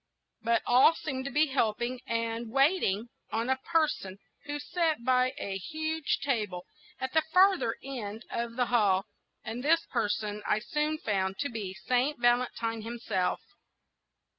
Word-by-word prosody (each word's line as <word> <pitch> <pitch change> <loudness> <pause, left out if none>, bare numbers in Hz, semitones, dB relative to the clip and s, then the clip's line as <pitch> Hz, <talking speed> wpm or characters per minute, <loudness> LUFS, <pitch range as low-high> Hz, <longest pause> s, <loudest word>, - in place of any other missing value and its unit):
But 230 0 +1
all 255 +7 +6
seemed 265 -5 -4
to 275 - -3
be 300 +3 +4
helping 245 -2 -1
and 230 0 -2
waiting 265 - +2 0.2
on 230 +4 0
a 265 - +2
person 300 - +1 0.3
who 290 0 -3
sat 315 -4 -1
by 255 0 +3
a 195 -1 -3
huge 315 - -2
table 210 -10 -1 0.3
at 260 0 -3
the 320 - +5
farther 365 -6 +3
end 225 -5 -6
of 235 0 -3
the 250 0 +2
hall, 205 -6 +3 0.4
and 230 +3 -5
this 330 +3 +3
person 210 0 -1
I - - +3
soon 300 +7 -1
found 195 -7 -1
to 285 - -1
be 205 -5 -5
Saint 255 +4 +1
Valentine 240 -2 +1
himself. 220 -5 -2
240 Hz, 145 wpm, -29 LUFS, 220-290 Hz, 0.4 s, all